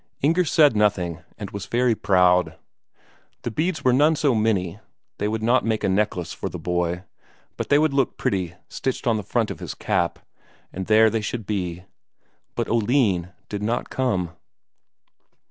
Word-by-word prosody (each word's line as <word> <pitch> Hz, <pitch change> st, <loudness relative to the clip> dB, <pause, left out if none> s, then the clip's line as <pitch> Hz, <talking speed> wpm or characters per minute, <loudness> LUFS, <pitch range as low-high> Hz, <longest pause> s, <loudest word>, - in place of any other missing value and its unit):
Inger 165 Hz, +5 st, +3 dB
said 150 Hz, -5 st, +4 dB
nothing, 95 Hz, -6 st, +1 dB, 0.2 s
and 100 Hz, -2 st, -7 dB
was 100 Hz, -1 st, -6 dB
very 120 Hz, 0 st, +2 dB
proud. 90 Hz, -3 st, +3 dB, 0.9 s
The 120 Hz, -, -3 dB
beads 160 Hz, +8 st, -1 dB
were 125 Hz, -, +4 dB
none 150 Hz, +5 st, +4 dB
so 145 Hz, -3 st, +2 dB
many; 105 Hz, -4 st, 0 dB, 0.4 s
they 105 Hz, -, 0 dB
would 110 Hz, +1 st, -2 dB
not 120 Hz, +3 st, +3 dB
make 110 Hz, -1 st, -1 dB
a -, -, +2 dB
necklace 95 Hz, -3 st, 0 dB
for -, -, -4 dB
the -, -, -6 dB
boy, 90 Hz, 0 st, -1 dB, 0.5 s
but -, -, -4 dB
they 145 Hz, -, +5 dB
would 155 Hz, -1 st, +2 dB
look 135 Hz, -2 st, +1 dB
pretty 90 Hz, -3 st, -1 dB
stitched 130 Hz, -, -3 dB
on 115 Hz, -3 st, +2 dB
the -, -, -2 dB
front 95 Hz, -, -1 dB
of -, -, -7 dB
his -, -, -6 dB
cap, -, -, 0 dB, 0.6 s
and 95 Hz, 0 st, -5 dB
there 110 Hz, 0 st, +5 dB
they 115 Hz, -, 0 dB
should 110 Hz, +1 st, -4 dB
be. 90 Hz, -4 st, -3 dB, 0.7 s
But -, -, -1 dB
Oline 110 Hz, -6 st, +1 dB, 0.2 s
did 105 Hz, -1 st, -5 dB
not 115 Hz, +3 st, -2 dB
come. 95 Hz, -10 st, 0 dB
105 Hz, 170 wpm, -23 LUFS, 90-125 Hz, 0.9 s, they